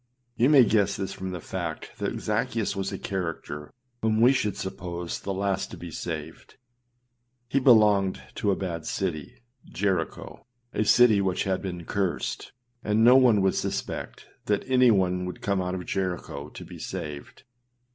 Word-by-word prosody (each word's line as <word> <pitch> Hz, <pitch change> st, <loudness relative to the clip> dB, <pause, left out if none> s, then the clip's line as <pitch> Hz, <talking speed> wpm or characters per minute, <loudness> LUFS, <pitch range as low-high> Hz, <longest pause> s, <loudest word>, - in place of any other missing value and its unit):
You 120 Hz, +4 st, +3 dB
may 140 Hz, -4 st, +8 dB
guess 100 Hz, -2 st, +2 dB
this 95 Hz, -1 st, -3 dB
from 95 Hz, -, -5 dB
the 90 Hz, -1 st, -5 dB
fact 85 Hz, -2 st, -6 dB
that -, -, -2 dB
Zaccheus 110 Hz, -3 st, -1 dB
was 95 Hz, 0 st, -2 dB
a -, -, -4 dB
character 80 Hz, -5 st, -4 dB, 0.3 s
whom 110 Hz, 0 st, +1 dB
we 125 Hz, +4 st, +6 dB
should 105 Hz, -6 st, -1 dB
suppose 90 Hz, -3 st, -5 dB
the 100 Hz, -, -4 dB
last 95 Hz, 0 st, -1 dB
to -, -, -9 dB
be 85 Hz, -1 st, -8 dB
saved. 80 Hz, -1 st, -6 dB, 0.9 s
He 135 Hz, +3 st, +1 dB
belonged 105 Hz, -7 st, +5 dB
to 105 Hz, -, -1 dB
a 100 Hz, -, +3 dB
bad 85 Hz, -4 st, -4 dB
city 90 Hz, +2 st, -4 dB, 0.2 s
â -, -, -18 dB
Jericho 95 Hz, -1 st, -2 dB, 0.3 s
â -, -, -4 dB
a 110 Hz, -, +2 dB
city 110 Hz, -3 st, +6 dB
which 95 Hz, -2 st, 0 dB
had 95 Hz, -1 st, -1 dB
been 90 Hz, -3 st, -5 dB
cursed, 95 Hz, -4 st, -2 dB, 0.3 s
and 105 Hz, +1 st, +2 dB
no 125 Hz, +2 st, +8 dB
one 125 Hz, -6 st, +5 dB
would 95 Hz, 0 st, +3 dB
suspect -, -, -4 dB, 0.2 s
that 105 Hz, -1 st, +1 dB
anyone 100 Hz, -9 st, +3 dB
would 90 Hz, -, -6 dB
come 100 Hz, -2 st, 0 dB
out 90 Hz, 0 st, -2 dB
of 90 Hz, -1 st, -5 dB
Jericho 90 Hz, -6 st, -3 dB
to -, -, -10 dB
be -, -, -11 dB
saved. 75 Hz, -2 st, -7 dB
95 Hz, 170 wpm, -26 LUFS, 90-105 Hz, 0.9 s, may